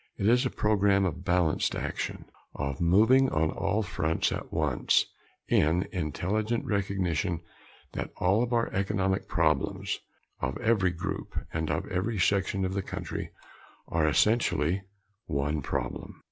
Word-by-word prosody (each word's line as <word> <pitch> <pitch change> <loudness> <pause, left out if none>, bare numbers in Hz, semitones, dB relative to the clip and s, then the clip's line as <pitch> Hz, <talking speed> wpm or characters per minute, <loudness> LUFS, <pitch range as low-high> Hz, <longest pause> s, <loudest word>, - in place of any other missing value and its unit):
It 100 - 0
is 125 +2 +4
a - - -3
program 100 -2 +2
of 90 0 -3
balanced 90 -3 +1
action - - -4 0.3
of 70 +2 -3
moving 110 +10 +5
on 80 0 +1
all 100 +3 0
fronts 80 -4 0
at - - -5
once - - +2 0.4
in 85 +5 +3
intelligent 100 +7 -1
recognition 95 -4 -1 0.5
that - - -3
all 95 +5 +3
of 120 0 -1
our 115 -1 +1
economic 95 -1 0
problems, 80 -6 0 0.4
of 65 - -2
every 110 -6 +2
group, 85 -1 -4
and 80 -1 -1
of - - -1
every 100 +5 -1
section 95 +1 +1
of 95 - -2
the 100 - 0
country - - -5 0.6
are 80 -1 +2
essentially 95 -1 +2 0.5
one 70 +2 -1
problem. - - -4
95 Hz, 135 wpm, -28 LUFS, 80-105 Hz, 0.6 s, moving